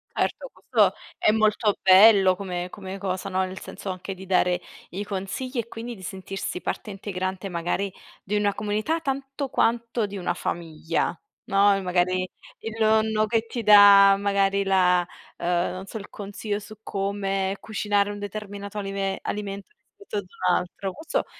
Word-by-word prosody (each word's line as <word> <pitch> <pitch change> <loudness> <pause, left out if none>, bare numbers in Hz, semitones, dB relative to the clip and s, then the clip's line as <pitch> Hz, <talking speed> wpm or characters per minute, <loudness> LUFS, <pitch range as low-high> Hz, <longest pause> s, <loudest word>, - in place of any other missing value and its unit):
Certo, - - -1
questo - - +2 0.2
è 215 - +4
molto 215 -1 +2
bello 190 0 +7
come 180 -2 -4
come 190 0 -7
cosa, 190 -1 -3
no, 190 0 +1
nel 185 0 -7
senso 195 - -8
anche 185 +1 -5
di 190 - -10
dare 180 -1 +2 0.3
i 195 +4 -4
consigli 205 +7 -4
e 230 - -3
quindi 235 +1 -7
di 190 - -14
sentirsi 190 0 -5
parte - - -4
integrante 190 -1 -4
magari 175 +3 -2 0.3
di 205 - -2
una 205 -1 +2
comunità 215 +11 -1
tanto 275 -1 -3
quanto 230 -1 +1
di 200 0 -6
una 175 -2 -1
famiglia, 165 -1 -2 0.3
no, 200 -2 +4
e 195 - -2
magari 185 0 +1 0.3
il 225 0 -6
nonno 220 0 +3
che 225 +1 0
ti 235 0 -4
dà 200 -1 +9
magari 200 0 +1
la 180 -2 +3 0.3
uhm, - - -4 0.2
non 185 +1 -7
so, 210 - -7
il 205 -1 -9
consiglio 205 +1 -4
su 215 0 -12
come 195 -1 -1
cucinare 205 -1 0
un 205 - -7
determinato 205 0 -6
alime 195 -1 -2
alimento 200 -1 -4
rispetto 405 - -9
ad 205 - -2
un 180 0 0
altro. 190 +2 -3
Questo 320 +1 -2
200 Hz, 165 wpm, -25 LUFS, 190-215 Hz, 0.3 s, dà